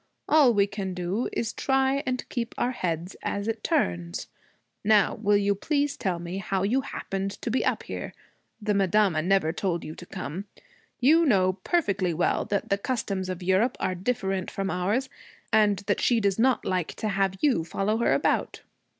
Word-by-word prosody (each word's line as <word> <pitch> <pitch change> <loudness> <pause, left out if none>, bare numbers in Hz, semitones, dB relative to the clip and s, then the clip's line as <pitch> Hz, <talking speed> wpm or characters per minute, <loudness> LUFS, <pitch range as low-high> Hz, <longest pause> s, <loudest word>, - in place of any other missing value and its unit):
All 295 -5 +6
we 205 -3 +3
can 200 -2 -5
do 180 +6 -2
is 230 -1 -2
try 270 +1 +1
and 255 0 -2
keep 240 -1 -4
our 245 - +1
heads 175 -5 -3
as 200 +1 -3
it 225 -1 -3
turns. 85 -1 -1 0.6
Now, 210 -1 +4
will 205 -1 +2
you 200 0 +2
please 285 +7 0
tell 185 -4 -1
me 175 +3 -5
how 190 0 -1
you 245 +7 +2
happened 195 -6 -4
to 235 - -1
be 255 - +1
up - - 0
here? - - -6 0.4
The 210 -1 0
madama 195 -3 +3
never 180 -2 +2
told 175 -2 -1
you 155 - -6
to 175 - -11
come. 185 0 -5 0.5
You 310 +7 +5
know 190 - +3
perfectly 195 - 0
well 175 - +1
that 200 -1 -2
the 200 - +1
customs 200 -5 -2
of 185 -1 -4
Europe 190 +7 +2
are 185 - 0
different 190 -1 -2
from 195 0 -3
ours, 205 +9 0 0.5
and 210 -2 +4
that 205 - 0
she 240 -2 +3
does 200 -1 +1
not 255 +2 +3
like 180 -3 -1
to 215 - -2
have 195 -1 0
you 265 - +2
follow 195 +6 -1
her 235 - +2
about.' - - 0
200 Hz, 185 wpm, -26 LUFS, 185-230 Hz, 0.6 s, All